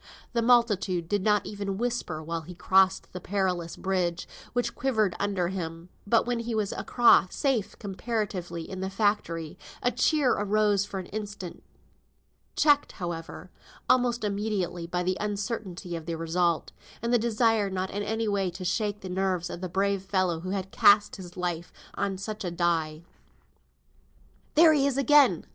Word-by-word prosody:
The 235 - +2
multitude 210 -8 +2
did 205 +2 0
not 210 -1 +2
even 200 -2 -4
whisper 230 -9 -2
while 165 +1 -3
he 175 +3 -10
crossed 190 +1 +2
the 180 - -6
perilous 180 -3 -1
bridge, 180 -3 -1 0.2
which 240 -1 -1
quivered 220 -8 0
under 195 -3 0
him; 170 -2 -5 0.2
but 230 +2 +3
when 240 -1 -1
he 230 0 -3
was 210 -2 0
across, 235 -6 +4
safe 245 -8 0
comparatively 190 -5 -4
in 190 - -6
the 190 0 -2
factory, 195 -6 -1 0.2
a 245 - +3
cheer 295 -3 +2
arose 205 -1 +2
for 195 -1 -5
an 185 - -6
instant, 200 -3 -7 0.9
checked, 290 -1 +3
however, 170 -3 -6 0.4
almost 245 -2 +2
immediately, 200 -4 -2
by 180 +1 -1
the 185 +1 0
uncertainty 200 -4 -4
of 165 0 -7
the 165 - -2
result, 165 0 0 0.3
and 235 +1 0
the 240 - +5
desire 225 -2 +2
not 190 0 -3
in 205 - -3
any 220 +2 -1
way 200 -2 0
to 180 +1 -7
shake 205 +2 -1
the 190 - -7
nerves 185 -1 -1
of 175 - -7
the 185 - -4
brave 195 +2 0
fellow 185 -3 0
who 185 +3 -6
had 190 -1 -3
cast 205 +1 +5
his 180 -1 -10
life 175 -1 -3 0.2
on 200 -1 -2
such 210 +2 -5
a 180 - -2
die. 165 -2 -1 1.5
"There 320 0 +7
he 280 -2 +3
is 275 -1 -1
again!" 275 - +5
195 Hz, 165 wpm, -27 LUFS, 180-215 Hz, 1.5 s, There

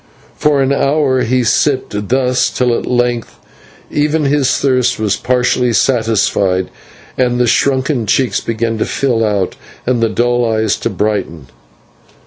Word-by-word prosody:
For 145 -2 +2
an 135 +1 +1
hour 140 -2 +1
he 125 +2 +1
sipped 115 -4 0
thus 125 -1 +1
till 125 -2 0
at - - -4
length 120 -1 -1 0.6
even 150 +1 0
his 140 -1 +1
thirst 130 -3 +1
was 105 -2 0
partially 125 -1 0
satisfied, 105 -6 +1 0.5
and 125 -1 +1
the 125 - +3
shrunken 130 -1 +1
cheeks 130 +5 +1
began 115 0 -2
to - - 0
fill 120 -5 0
out 100 -4 -1 0.3
and 120 -1 0
the 115 - +2
dull 120 +2 +1
eyes 110 -2 0
to - - -2
brighten. 95 - -3
120 Hz, 140 wpm, -14 LUFS, 110-130 Hz, 0.6 s, the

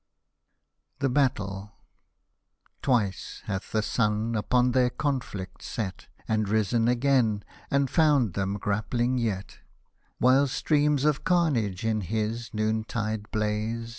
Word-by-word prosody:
THE 135 0 0
BATTLE 105 -7 0 1.1
Twice 115 -8 -1
hath 95 -2 -4
the 110 -1 +1
sun 105 +1 0
upon 125 +3 +2
their 125 0 +3
conflict 120 -10 -3
set, 95 -6 -5 0.2
And 110 -2 0
risen 110 +2 +2
again, 120 -4 +2 0.3
and 140 0 +2
found 140 - +3
them 95 +1 -1
grappling 120 +5 0
yet; 100 -5 -3 0.6
While 130 +3 +4
streams 145 0 +1
of 150 -2 +1
carnage 120 - +1
in 110 -1 +1
his 110 +4 -2
noontide 110 0 -2
blaze. 110 +1 -2
115 Hz, 110 wpm, -27 LUFS, 105-130 Hz, 1.1 s, While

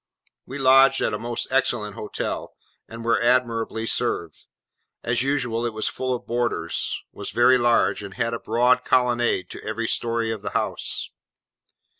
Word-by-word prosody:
We 130 - -6
lodged 135 0 +6
at - - 0
a - - -2
most 120 0 -2
excellent 120 -6 0
hotel, 105 - -5 0.3
and 115 0 -8
were 115 - +2
admirably 115 -2 +1
served. - - -2 0.6
As 115 +1 +1
usual 125 -4 -1
it 120 -2 -2
was 110 0 -2
full 130 -1 -2
of 120 - -8
boarders, 120 0 -1
was - - -7
very 125 +2 +4
large, 120 -2 +2
and 100 -2 -9
had 115 0 -1
a 115 - -3
broad 125 +3 +2
colonnade 120 -7 +1
to - - -8
every 115 +2 -3
story 115 -1 -1
of 110 -2 -5
the - - -2
house. - - -2
120 Hz, 160 wpm, -23 LUFS, 115-125 Hz, 0.6 s, lodged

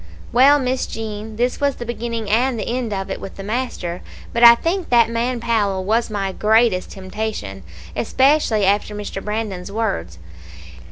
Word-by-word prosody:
"Well, 270 +4 +6
Miss 260 -1 -1
Jean, 220 -1 -6
this 245 +4 -1
was 280 -2 +1
the 240 - -7
beginning 230 -1 -4
and 240 +4 +2
the 205 - -4
end 240 -1 -2
of 195 -1 -3
it - - -5
with 195 - -8
the 195 - -8
master; 205 -6 -3 0.3
but 235 - +1
I 235 0 +11
think 345 +7 -2
that 235 -2 +4
man 240 +2 -1
Powell 205 -5 0
was 225 +4 +1
my 200 -2 -2
greatest 215 -1 +2
temptation, 190 - -5 0.3
especially 265 -7 +2
after 205 +2 +1
Mr. 205 -1 -6
Brandon's 210 -3 -4
words. 90 - -2
220 Hz, 165 wpm, -20 LUFS, 200-240 Hz, 0.3 s, I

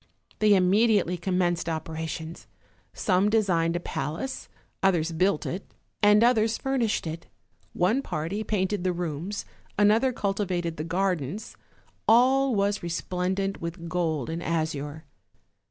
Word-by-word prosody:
They 210 -1 +5
immediately 195 0 +3
commenced 175 -1 0
operations; 160 0 -5 0.4
some 190 +1 +2
designed 175 -6 +2
a - - 0
palace, 170 - -4 0.3
others 175 -4 +2
built 175 0 +1
it, 185 +3 -6 0.3
and 210 +1 +6
others 225 -2 +3
furnished 255 -8 0
it; 165 +1 -6 0.5
one 215 +10 +2
party 185 - -3
painted 195 -2 -1
the 185 -1 +1
rooms, 175 +3 -4 0.3
another 215 +5 +4
cultivated 190 -6 -2
the 155 - -3
gardens; 180 - -2 0.5
all 260 +2 +5
was 200 0 +1
resplendent 185 +3 -2
with 170 0 -5
gold 160 -6 -1
and 165 +1 -3
azure. 155 -2 -3
180 Hz, 120 wpm, -27 LUFS, 165-210 Hz, 0.5 s, and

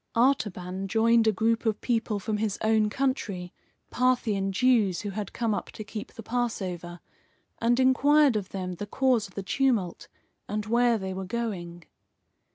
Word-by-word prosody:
Artaban 195 -7 0
joined 225 +2 +3
a - - +6
group 225 +3 +1
of 220 -3 0
people 225 -3 0
from 210 +2 -2
his 210 -2 -1
own 220 -1 +3
country, 210 -8 -2 0.4
Parthian 230 -6 +1
Jews 215 -4 +2
who 205 - -4
had 205 0 -5
come 230 -2 -1
up - - -4
to 215 - -7
keep 210 +1 -7
the 225 - -9
Passover, 190 -8 -3 0.6
and 240 +2 +2
inquired 275 +1 +4
of 200 -3 -2
them 185 -2 -4
the 205 - -5
cause 250 -2 +1
of 190 - -21
the 195 - -4
tumult, 220 -5 0 0.4
and 210 +1 -2
where 235 +1 +3
they 190 -2 -4
were 190 0 -5
going. 180 -6 -4
215 Hz, 165 wpm, -27 LUFS, 195-240 Hz, 0.6 s, a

